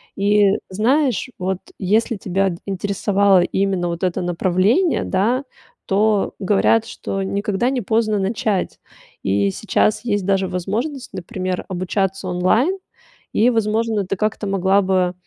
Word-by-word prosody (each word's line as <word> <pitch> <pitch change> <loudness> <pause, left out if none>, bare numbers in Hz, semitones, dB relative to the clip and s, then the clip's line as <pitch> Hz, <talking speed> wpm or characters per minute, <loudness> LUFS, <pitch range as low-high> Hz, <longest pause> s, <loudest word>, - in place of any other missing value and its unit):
И 205 +1 +3 0.3
знаешь, 250 +6 +1
вот 185 0 -2 0.2
если 215 +5 +1
тебя 195 0 0
интересовало 200 0 +2
именно 190 0 0
вот 170 +1 -4
это 185 0 0
направление, 185 - +1
да, 230 +8 0 0.4
то 205 +1 +2
говорят, 210 +3 +2
что 195 -4 -4
никогда 200 +4 -1
не 260 -2 -1
поздно 215 0 +1
начать. 200 -1 -1 0.4
И 100 +1 +1
сейчас 215 - 0
есть 205 -5 0
даже 195 -1 +1
возможность, 225 - -3
например, 185 0 -4
обучаться 190 +1 -2
онлайн. 215 - +2 0.6
И, 230 +3 +4
возможно, 220 -2 0
ты 195 - -2
как-то 215 +1 -2
могла 195 0 +2
бы, 185 -2 +1
195 Hz, 125 wpm, -20 LUFS, 185-220 Hz, 0.6 s, И